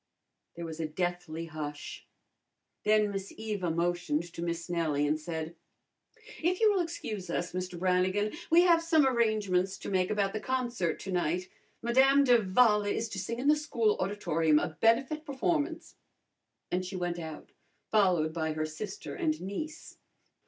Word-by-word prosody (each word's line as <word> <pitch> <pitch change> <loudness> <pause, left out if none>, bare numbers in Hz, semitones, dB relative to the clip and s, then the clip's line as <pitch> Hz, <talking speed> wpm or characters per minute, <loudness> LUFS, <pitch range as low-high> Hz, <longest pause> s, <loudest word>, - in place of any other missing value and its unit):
There 170 0 -6
was 160 0 -7
a 160 - -1
deathly 175 0 -3
hush. 150 -2 -7 0.8
Then 210 -1 +4
Miss 195 0 -5
Eva 210 -5 -2
motioned 170 -2 0
to - - -6
Miss 170 0 -3
Nellie 160 -4 0
and 150 +1 +1
said, 160 +1 -5 0.9
"If 355 +3 +1
you 440 -2 +5
will 390 - +1
excuse 220 - -5
us, 170 0 -2
Mr. 180 -1 -4
Brannigan, 185 +3 +1 0.2
we 340 +2 +6
have 340 -2 +5
some 325 -3 +4
arrangements 210 -7 +1
to - - -6
make 185 -1 +1
about 200 -2 0
the 215 - -2
concert 240 -7 -1
to 195 - -5
night. 180 +1 -1 0.3
Madame 265 +4 +5
d'Avala 210 -3 +4
is 225 +2 -2
to 200 - -5
sing 230 +5 -3
in 255 +3 -2
the 300 - +6
school 230 -8 +1
auditorium, 165 -6 +1
a - - +1
benefit 250 - +2
performance," 310 +2 -2 0.7
and 180 +1 0
she 185 +1 -6
went 175 -1 -2
out, 160 -2 -8 0.4
followed 180 -7 +3
by 160 -1 -1
her 155 0 -1
sister 190 +6 -6
and 315 -2 -1
niece. 310 - -6
190 Hz, 160 wpm, -30 LUFS, 170-235 Hz, 0.9 s, we